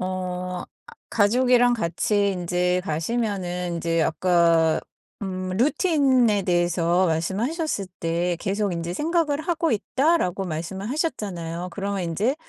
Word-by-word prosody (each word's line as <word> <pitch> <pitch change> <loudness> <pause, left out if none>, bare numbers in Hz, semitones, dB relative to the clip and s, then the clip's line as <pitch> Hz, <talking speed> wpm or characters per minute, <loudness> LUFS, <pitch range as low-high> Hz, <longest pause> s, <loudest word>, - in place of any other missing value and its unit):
어 180 -1 -3 0.2
아 - - -14 0.2
가족이랑 245 +3 +4
같이 200 +1 0
인제 180 0 0
가시면은 180 0 -2
인제 165 -1 0
아까 165 -1 +3 0.4
음 185 -1 -3
루틴에 260 - +3
대해서 175 0 +2
말씀하셨을 200 - -1
때 170 +1 0
"계속 200 0 -1
인제 170 0 -3
생각을 310 - 0
하고 330 0 0
있다."라고 225 - +1
말씀을 180 +4 -4
하셨잖아요. 185 - -3
그러면 200 +1 -3
인제 195 +10 0
190 Hz, 275 characters per minute, -24 LUFS, 175-240 Hz, 0.4 s, 가족이랑